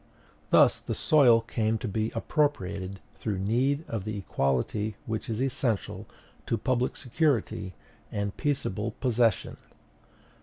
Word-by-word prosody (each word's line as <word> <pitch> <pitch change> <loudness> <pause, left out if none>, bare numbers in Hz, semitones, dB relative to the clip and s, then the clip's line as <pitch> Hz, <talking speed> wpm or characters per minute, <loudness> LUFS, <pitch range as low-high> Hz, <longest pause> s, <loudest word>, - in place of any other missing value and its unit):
Thus - - +6
the - - -4
soil 125 -7 +5
came 110 -1 0
to 120 - -4
be 110 +2 -1
appropriated 100 -8 -1
through 105 -4 -3
need 130 - +1
of 110 -4 -3
the 105 0 -4
equality 100 - -1
which 110 +3 -4
is 110 0 -2
essential 130 -5 -1 0.4
to 115 - +1
public 125 +2 0
security 125 - 0 0.4
and 100 -1 -2
peaceable 115 -7 -2
possession. 120 -4 +1
110 Hz, 120 wpm, -28 LUFS, 100-130 Hz, 0.4 s, Thus